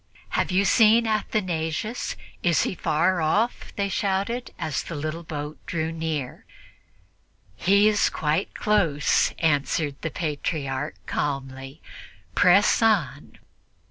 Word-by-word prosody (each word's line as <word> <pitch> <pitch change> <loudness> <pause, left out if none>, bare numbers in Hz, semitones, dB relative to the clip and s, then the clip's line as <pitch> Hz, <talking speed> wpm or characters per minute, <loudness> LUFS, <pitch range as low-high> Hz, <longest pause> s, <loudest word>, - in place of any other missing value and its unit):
"Have - - 0
you 190 +2 +2
seen 225 +2 +5
Athanasius? 210 -1 -2 0.3
Is 170 -2 +2
he - - -2
far 175 +1 +1
off?" 210 +10 0
they 200 -1 0
shouted, 200 +5 -1
as 155 - -2
the 165 - -7
little 155 +3 -4
boat 150 -2 -6
drew 160 -1 -2
near. 160 -5 -4 1.1
"He 200 - +4
is 210 -1 +3
quite 155 +5 -1
close," 170 -9 +2
answered 145 -1 0
the 160 - -2
Patriarch 145 -3 -3
calmly; 135 0 -4 0.5
"press 190 - +4
on." 175 -11 0
165 Hz, 110 wpm, -24 LUFS, 150-200 Hz, 1.1 s, seen